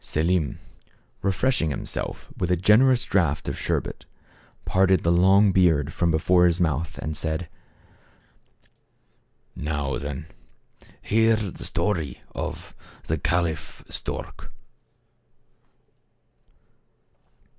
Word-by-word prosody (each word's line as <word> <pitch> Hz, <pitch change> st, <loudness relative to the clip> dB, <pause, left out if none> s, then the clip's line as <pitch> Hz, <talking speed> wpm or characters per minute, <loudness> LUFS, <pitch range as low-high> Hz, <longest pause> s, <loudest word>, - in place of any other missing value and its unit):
Selim, 80 Hz, 0 st, 0 dB, 0.6 s
refreshing 100 Hz, -2 st, +1 dB
himself 70 Hz, -, -5 dB
with 90 Hz, -, -2 dB
a 90 Hz, -, +3 dB
generous 120 Hz, +8 st, +4 dB
draught 85 Hz, -7 st, 0 dB
of -, -, -2 dB
sherbet, -, -, -3 dB, 0.6 s
parted 95 Hz, -2 st, +3 dB
the 85 Hz, -, +3 dB
long 95 Hz, +3 st, +5 dB
beard 80 Hz, -6 st, +3 dB
from 85 Hz, -, +1 dB
before 90 Hz, +3 st, +4 dB
his 85 Hz, +1 st, +1 dB
mouth, 80 Hz, -2 st, -1 dB
and 80 Hz, 0 st, -4 dB
said: 80 Hz, +2 st, -2 dB, 2.1 s
"Now, 75 Hz, -3 st, -2 dB
then, 70 Hz, 0 st, -5 dB, 0.8 s
hear 115 Hz, +1 st, +3 dB
the 105 Hz, -5 st, -5 dB
story 80 Hz, -11 st, -2 dB
of -, -, -6 dB, 0.3 s
the 80 Hz, 0 st, -2 dB
Caliph 80 Hz, -1 st, -2 dB
Stork." -, -, -6 dB
85 Hz, 95 wpm, -24 LUFS, 80-95 Hz, 2.1 s, long